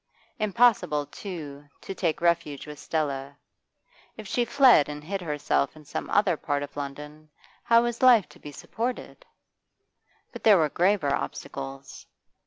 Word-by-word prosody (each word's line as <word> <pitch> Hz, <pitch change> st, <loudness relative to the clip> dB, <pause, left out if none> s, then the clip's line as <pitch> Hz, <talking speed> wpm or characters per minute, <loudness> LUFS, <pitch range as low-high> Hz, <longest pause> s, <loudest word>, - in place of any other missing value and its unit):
Impossible, 215 Hz, -9 st, +2 dB
too, 150 Hz, -6 st, -8 dB
to -, -, -7 dB
take 170 Hz, -4 st, -2 dB
refuge 170 Hz, -5 st, 0 dB
with 150 Hz, -2 st, -10 dB
Stella. 140 Hz, -3 st, -3 dB, 0.8 s
If 215 Hz, -, -9 dB
she 240 Hz, +4 st, 0 dB
fled 245 Hz, -, +5 dB
and 150 Hz, 0 st, -7 dB
hid 195 Hz, +4 st, -4 dB
herself 150 Hz, -3 st, -1 dB
in 155 Hz, -1 st, -15 dB
some 145 Hz, -, -5 dB
other 195 Hz, -4 st, +2 dB
part 145 Hz, -1 st, -2 dB
of 145 Hz, -, -9 dB
London, 150 Hz, +2 st, -8 dB, 0.3 s
how 230 Hz, 0 st, +4 dB
was 240 Hz, -1 st, -3 dB
life 245 Hz, -6 st, +6 dB
to -, -, -17 dB
be 150 Hz, -, -10 dB
supported? 240 Hz, -, -5 dB, 1.1 s
But -, -, -10 dB
there 210 Hz, -3 st, +7 dB
were 155 Hz, -3 st, +2 dB
graver 175 Hz, -4 st, +1 dB
obstacles. 135 Hz, -1 st, -6 dB
155 Hz, 145 wpm, -26 LUFS, 145-205 Hz, 1.1 s, there